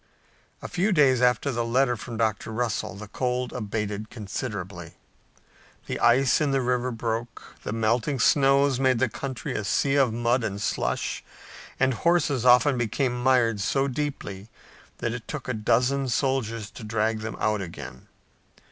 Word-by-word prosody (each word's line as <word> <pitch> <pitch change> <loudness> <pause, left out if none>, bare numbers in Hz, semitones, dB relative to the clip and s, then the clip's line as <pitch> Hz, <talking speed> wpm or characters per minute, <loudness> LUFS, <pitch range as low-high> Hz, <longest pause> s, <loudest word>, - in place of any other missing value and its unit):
A - - -4
few 195 +4 0
days 135 -8 +4
after 125 +2 +2
the 120 -1 -1
letter 125 +2 +2
from 115 +1 -7
Dr. 110 -1 -1
Russell 110 -5 -2
the 105 +1 -9
cold 125 +3 -2
abated 105 -2 -3
considerably. 100 -6 -6 0.9
The - - -4
ice 125 +5 +4
in 150 - +2
the 135 0 +2
river 125 0 0
broke, 115 0 -4
the - - -5
melting 115 +5 0
snows 135 +1 +4
made 130 -2 +3
the 130 +2 +2
country 130 +2 -5
a 105 - -2
sea 135 +7 +1
of 130 -4 +3
mud 120 +2 +1
and 100 -2 -3
slush 60 - -2 0.6
and 135 -1 +3
horses 145 -3 +1
often 125 +2 +5
became 120 +2 0
mired 125 -4 +3
so 135 +7 +1
deeply 125 -8 -4 0.5
that 120 - -2
it 120 -1 -7
took 145 -4 -6
a 125 - -1
dozen 125 +5 +1
soldiers 115 -4 -1
to 125 - -10
drag 110 +1 0
them 110 +1 -5
out 105 -1 +1
again. 85 -7 -9
120 Hz, 155 wpm, -26 LUFS, 110-130 Hz, 0.9 s, often